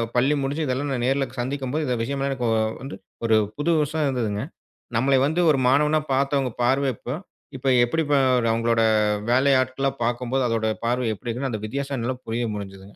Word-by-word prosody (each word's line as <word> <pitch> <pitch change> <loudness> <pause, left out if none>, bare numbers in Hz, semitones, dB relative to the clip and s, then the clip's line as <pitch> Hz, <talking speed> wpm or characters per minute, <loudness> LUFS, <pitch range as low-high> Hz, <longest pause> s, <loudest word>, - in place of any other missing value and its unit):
பள்ளி 135 +5 +3
முடிஞ்சு, 140 +4 -2
இதெல்லாம் 130 -1 -1
நேர்ல 135 +1 +1 0.2
சந்திக்கும்போது, 135 +3 -2
இந்த 125 - 0
விஷயம்லாம் 140 +3 -2
எனக்கு 125 -3 -2 0.3
வந்து 135 +3 -7 0.3
ஒரு 110 -1 +4 0.2
புதுசா 155 0 +1
இருந்ததுங்க. 115 -5 -1 0.5
நம்மளை 130 +4 +3
வந்து 160 +5 +1
ஒரு 145 - +4
மாணவனா 150 +4 +3
பாத்தவங்க 135 -1 +1
பார்வை 135 +3 +2
இப்ப, 125 +7 -5 0.4
இப்ப 130 +1 -5 0.2
எப்டி 160 +7 0
ப - - +4 0.4
அவங்களோட 115 0 +1 0.5
வேலையாட்களா 130 +1 +2
பாக்கும்போது, 125 +2 0
அதோட 115 -1 0 0.2
பார்வை 125 +1 0
எப்டி 105 - -11
இருக்குன்னு 130 +3 -2
அந்த 110 -2 -4
வித்தியாசல்லாம் 135 +3 -3
என்னால 125 +2 -2
புரிய 115 +2 -1
முடிஞ்சுதுங்க. 95 0 -9
130 Hz, 160 wpm, -24 LUFS, 120-140 Hz, 0.5 s, ஒரு